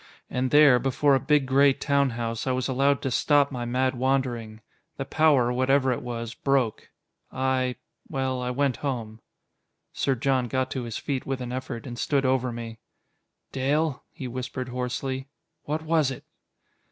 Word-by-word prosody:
And 130 Hz, +1 st, 0 dB
there, 145 Hz, -3 st, +7 dB
before 135 Hz, +3 st, +2 dB
a 135 Hz, -, +4 dB
big 145 Hz, +1 st, +2 dB
gray 135 Hz, +1 st, +5 dB
town 140 Hz, 0 st, +1 dB
house, 115 Hz, +1 st, -3 dB
I 130 Hz, -, +2 dB
was 130 Hz, 0 st, -1 dB
allowed 140 Hz, +1 st, +2 dB
to 135 Hz, -, -1 dB
stop 145 Hz, +3 st, +3 dB
my 125 Hz, -2 st, -4 dB
mad 130 Hz, +2 st, +1 dB
wandering. 125 Hz, -4 st, -1 dB, 0.4 s
The 135 Hz, -, -3 dB
power, 140 Hz, -6 st, +3 dB
whatever 130 Hz, +1 st, +2 dB
it 125 Hz, -, -2 dB
was, 115 Hz, -1 st, -5 dB
broke. 135 Hz, -5 st, 0 dB, 0.4 s
I 130 Hz, -1 st, 0 dB, 0.3 s
well, 130 Hz, -1 st, -1 dB
I 125 Hz, -, -2 dB
went 135 Hz, 0 st, 0 dB
home." 115 Hz, -6 st, -4 dB, 0.7 s
Sir 135 Hz, -, 0 dB
John 130 Hz, 0 st, +1 dB
got 130 Hz, +2 st, -1 dB
to 130 Hz, -3 st, -3 dB
his 115 Hz, -2 st, -4 dB
feet 135 Hz, -3 st, -3 dB
with 135 Hz, -1 st, -2 dB
an 125 Hz, -1 st, -5 dB
effort, 125 Hz, -2 st, -5 dB
and 120 Hz, -2 st, -7 dB
stood 140 Hz, -2 st, +1 dB
over 130 Hz, -1 st, +1 dB
me. 115 Hz, -1 st, -7 dB, 0.7 s
"Dale," 140 Hz, +2 st, 0 dB
he 130 Hz, -, -7 dB
whispered 130 Hz, +1 st, -5 dB
hoarsely, 125 Hz, +2 st, -3 dB, 0.4 s
"what 155 Hz, +2 st, -2 dB
was 160 Hz, -3 st, +2 dB
it?" 135 Hz, -, -7 dB
130 Hz, 165 wpm, -26 LUFS, 125-140 Hz, 0.7 s, there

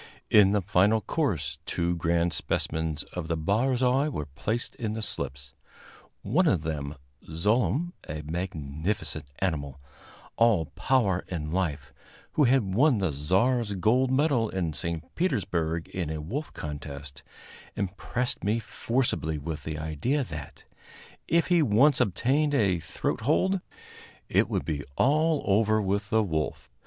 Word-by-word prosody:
In 105 Hz, -2 st, +7 dB
the 105 Hz, -2 st, +1 dB
final 105 Hz, +3 st, +3 dB
course 80 Hz, -, -1 dB
two 85 Hz, 0 st, 0 dB
grand 85 Hz, 0 st, +1 dB
specimens 80 Hz, -2 st, -2 dB
of 90 Hz, -3 st, -4 dB
the 80 Hz, -1 st, -1 dB
barzoi 125 Hz, -, +2 dB
were 75 Hz, -, -3 dB
placed 110 Hz, -, -3 dB
in 110 Hz, -2 st, -2 dB
the 110 Hz, -, -4 dB
slips; 70 Hz, -6 st, -5 dB, 0.7 s
one 180 Hz, +3 st, +2 dB
of 90 Hz, -, +2 dB
them, 75 Hz, -2 st, -3 dB, 0.3 s
Zlooem, 120 Hz, -, +1 dB, 0.2 s
a 75 Hz, 0 st, -4 dB
magnificent 80 Hz, 0 st, -3 dB
animal, 70 Hz, -7 st, -2 dB, 0.6 s
all 115 Hz, -8 st, +4 dB
power 105 Hz, -9 st, +1 dB
and 80 Hz, -4 st, -4 dB
life, 75 Hz, -7 st, -2 dB, 0.4 s
who 150 Hz, -, +3 dB
had 120 Hz, -7 st, +2 dB
won 130 Hz, +3 st, +4 dB
the 95 Hz, -5 st, 0 dB
Czar's 100 Hz, -, +1 dB
gold 120 Hz, +8 st, +3 dB
medal 130 Hz, -4 st, +2 dB
in 85 Hz, -4 st, -2 dB
St. 85 Hz, +1 st, -3 dB
Petersburg 85 Hz, -, -1 dB
in 90 Hz, -5 st, -3 dB
a 80 Hz, 0 st, -3 dB
wolf 125 Hz, -, -4 dB
contest, 70 Hz, -2 st, -7 dB, 0.5 s
impressed 100 Hz, +5 st, -3 dB
me 105 Hz, +4 st, +2 dB
forcibly 115 Hz, -, -1 dB
with 75 Hz, +1 st, -5 dB
the 80 Hz, -1 st, -3 dB
idea 80 Hz, -, -1 dB
that, 75 Hz, -, -8 dB, 0.6 s
if 170 Hz, -2 st, +3 dB
he 175 Hz, -2 st, +5 dB
once 135 Hz, +3 st, +4 dB
obtained 135 Hz, +10 st, +2 dB
a 95 Hz, -8 st, +2 dB
throat -, -, -3 dB
hold, 185 Hz, -, +2 dB, 0.7 s
it -, -, +3 dB
would -, -, -1 dB
be 70 Hz, -2 st, -2 dB
all 155 Hz, +2 st, +3 dB
over 110 Hz, +2 st, +3 dB
with 100 Hz, 0 st, -1 dB
the 110 Hz, -1 st, +3 dB
wolf. 80 Hz, -7 st, -3 dB
95 Hz, 140 wpm, -27 LUFS, 80-125 Hz, 0.7 s, In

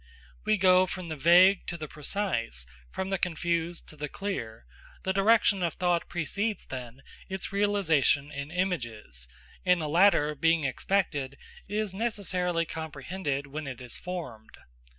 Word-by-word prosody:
We 215 Hz, 0 st, +3 dB
go 185 Hz, -1 st, +5 dB
from 180 Hz, -1 st, -6 dB
the 155 Hz, -, -3 dB
vague 180 Hz, +6 st, +6 dB
to 175 Hz, -, -4 dB
the 155 Hz, -2 st, -6 dB
precise, 150 Hz, -, -2 dB, 0.2 s
from 190 Hz, -, -4 dB
the 195 Hz, -, 0 dB
confused 170 Hz, 0 st, -1 dB
to -, -, -11 dB
the 150 Hz, -1 st, -5 dB
clear; 120 Hz, -, -5 dB, 0.4 s
the 190 Hz, -, 0 dB
direction 200 Hz, 0 st, +4 dB
of 170 Hz, -2 st, 0 dB
thought 175 Hz, -2 st, 0 dB
precedes, 200 Hz, +6 st, -2 dB
then, 125 Hz, 0 st, -8 dB, 0.3 s
its 190 Hz, 0 st, -3 dB
realisation 165 Hz, -8 st, +2 dB
in 140 Hz, 0 st, -5 dB
images; 115 Hz, -, -3 dB, 0.4 s
and 180 Hz, -1 st, +4 dB
the 155 Hz, -, -2 dB
latter, 160 Hz, -2 st, +4 dB
being 165 Hz, +2 st, +2 dB
expected, 140 Hz, -1 st, -1 dB, 0.3 s
is 210 Hz, -2 st, -2 dB
necessarily 180 Hz, -6 st, -1 dB
comprehended 150 Hz, -1 st, -4 dB
when 145 Hz, +1 st, -6 dB
it 130 Hz, -2 st, -6 dB
is 125 Hz, -2 st, -7 dB
formed. 155 Hz, -12 st, -7 dB
170 Hz, 145 wpm, -28 LUFS, 140-190 Hz, 0.4 s, vague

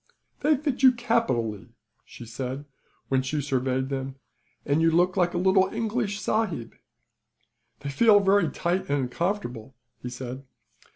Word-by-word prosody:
"They 300 Hz, -1 st, +3 dB
fit 280 Hz, -2 st, -2 dB
you 260 Hz, -1 st, +7 dB
capitally," 230 Hz, -, -1 dB, 0.4 s
she 120 Hz, -, -11 dB
said, 130 Hz, +4 st, -5 dB, 0.4 s
when 130 Hz, -1 st, +2 dB
she 135 Hz, +3 st, -2 dB
surveyed 130 Hz, -1 st, -1 dB
him. 135 Hz, 0 st, -4 dB, 0.5 s
"And 145 Hz, +3 st, +2 dB
you 165 Hz, -, +5 dB
look 175 Hz, +2 st, +2 dB
like 175 Hz, -1 st, +1 dB
a -, -, +1 dB
little 190 Hz, +1 st, +3 dB
English 215 Hz, -2 st, -2 dB
sahib." 210 Hz, -, -1 dB, 1.1 s
"They 140 Hz, -, -4 dB
feel 205 Hz, +8 st, +5 dB
very 195 Hz, -3 st, +3 dB
tight 175 Hz, +3 st, -2 dB
and 140 Hz, -1 st, +1 dB
uncomfortable," 130 Hz, -, -3 dB, 0.3 s
he 125 Hz, -, -5 dB
said. 125 Hz, +2 st, -7 dB
160 Hz, 140 wpm, -26 LUFS, 130-205 Hz, 1.1 s, you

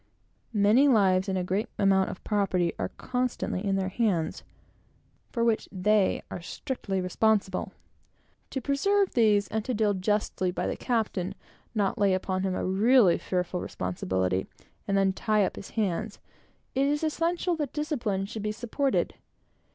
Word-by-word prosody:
Many 215 Hz, +7 st, +5 dB
lives 195 Hz, -6 st, +3 dB
and 190 Hz, -, 0 dB
a 180 Hz, -, 0 dB
great 190 Hz, +4 st, -1 dB
amount 195 Hz, -1 st, +3 dB
of -, -, -8 dB
property 190 Hz, -5 st, +1 dB
are -, -, -1 dB
constantly 250 Hz, -6 st, -2 dB
in 195 Hz, -2 st, +1 dB
their 190 Hz, -1 st, 0 dB
hands, 190 Hz, -6 st, 0 dB, 0.9 s
for 235 Hz, -, -1 dB
which 230 Hz, -2 st, +1 dB
they 200 Hz, +1 st, +2 dB
are 180 Hz, -, -5 dB
strictly 195 Hz, +1 st, -4 dB
responsible. 195 Hz, +2 st, +1 dB, 0.8 s
To 265 Hz, -, -3 dB
preserve 390 Hz, -, +1 dB
these, 210 Hz, -4 st, +3 dB
and 220 Hz, 0 st, -1 dB
to 250 Hz, +2 st, -2 dB
deal 210 Hz, -1 st, +2 dB
justly 190 Hz, -1 st, 0 dB
by 180 Hz, -, -2 dB
the -, -, -1 dB
captain, 220 Hz, -7 st, -1 dB
and -, -, -7 dB, 0.4 s
not 205 Hz, +2 st, 0 dB
lay 200 Hz, -2 st, +4 dB
upon 185 Hz, 0 st, -2 dB
him 190 Hz, -1 st, -1 dB
a -, -, -2 dB
really 200 Hz, 0 st, +4 dB
fearful 180 Hz, -1 st, -2 dB
responsibility, 95 Hz, 0 st, -2 dB, 0.4 s
and 195 Hz, -, +1 dB
then 195 Hz, -1 st, +3 dB
tie 215 Hz, 0 st, +2 dB
up -, -, -4 dB
his 200 Hz, -, -9 dB
hands, 210 Hz, 0 st, -2 dB, 0.6 s
it 270 Hz, +1 st, +2 dB
is 295 Hz, +2 st, 0 dB
essential 335 Hz, +3 st, 0 dB
that 295 Hz, -4 st, -2 dB
discipline 240 Hz, -, -1 dB
should 215 Hz, +1 st, -6 dB
be 210 Hz, +1 st, -1 dB
supported. 240 Hz, +5 st, -1 dB
205 Hz, 160 wpm, -28 LUFS, 190-235 Hz, 0.9 s, Many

